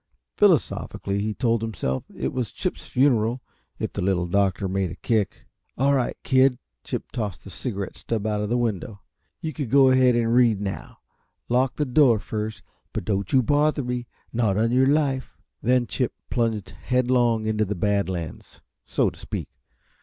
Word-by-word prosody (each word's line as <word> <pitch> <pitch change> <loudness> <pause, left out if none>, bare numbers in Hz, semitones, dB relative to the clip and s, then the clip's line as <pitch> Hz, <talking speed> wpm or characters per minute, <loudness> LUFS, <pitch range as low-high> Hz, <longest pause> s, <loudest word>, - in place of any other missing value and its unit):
Philosophically 100 0 +1
he 105 0 -2
told 115 -3 +1
himself 95 -13 -2
it - - -2
was 125 -5 -2
Chip's - - -4
funeral, 125 -3 +2 0.4
if - - -4
the - - -3
Little 90 -1 +1
Doctor 95 +1 +1
made 95 -1 -1
a 85 - -7
kick. 105 -1 -1 0.3
"All 140 +2 +3
right, 130 -3 0
kid." 130 -1 +4 0.3
Chip - - -5
tossed 105 -7 -4
the 100 - -10
cigarette 100 -5 -4
stub 110 -2 -3
out 105 -1 0
of 105 - -2
the 120 - +2
window. 105 -3 -2 0.4
"You 160 -1 -3
can 140 -4 -4
go 135 +1 +6
ahead 130 -1 +5
and 115 -1 +2
read, 120 -4 +4
now. 100 -1 -5 0.5
Lock 125 +1 +2
the 150 - 0
door 130 -3 +5
first, 105 +1 -4 0.3
and - - -3
don't 100 -2 -1
you 130 -1 +4
bother 145 +2 +2
me 125 -1 -3 0.3
not 110 -4 +1
on 115 +2 +2
your 130 +2 +4
life." 140 -3 0 0.2
Then 125 +1 +3
Chip 125 0 -2 0.2
plunged 110 -6 0
headlong 120 +2 +1
into 110 0 +1
the 105 0 -2
Bad 100 +2 +1
Lands, 85 -4 -6 0.3
so - - +1
to - - -16
speak. - - -5
115 Hz, 175 wpm, -24 LUFS, 100-125 Hz, 0.5 s, go